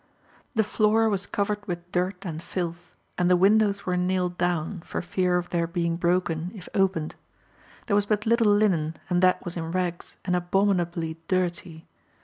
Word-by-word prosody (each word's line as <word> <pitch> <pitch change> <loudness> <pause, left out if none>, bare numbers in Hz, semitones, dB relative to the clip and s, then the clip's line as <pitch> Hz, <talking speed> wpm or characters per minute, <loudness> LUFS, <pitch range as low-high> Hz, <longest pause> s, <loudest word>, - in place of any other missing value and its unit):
The 220 - +4
floor 215 +1 +2
was 200 -2 -2
covered 205 0 -1
with 175 -1 -5
dirt 180 +2 -1
and 165 -3 -4
filth, 170 -1 -5 0.2
and 180 0 +3
the 180 - +6
windows 200 +1 +3
were 180 - 0
nailed 180 0 0
down, 175 +1 -1
for - - -4
fear 180 0 +1
of 180 0 -4
their 170 -1 +1
being 170 -1 -1
broken 170 -1 0
if 185 -3 -10
opened. 185 -5 +1 0.7
There 205 - +1
was 205 0 +2
but 210 0 0
little 230 -2 +4
linen, 180 -7 +2
and 175 0 +3
that 185 0 +3
was 175 0 -4
in 165 -1 -3
rags, 180 -1 -3
and 180 -1 +1
abominably 175 -3 0
dirty. 175 -3 -2
180 Hz, 170 wpm, -26 LUFS, 170-200 Hz, 0.7 s, the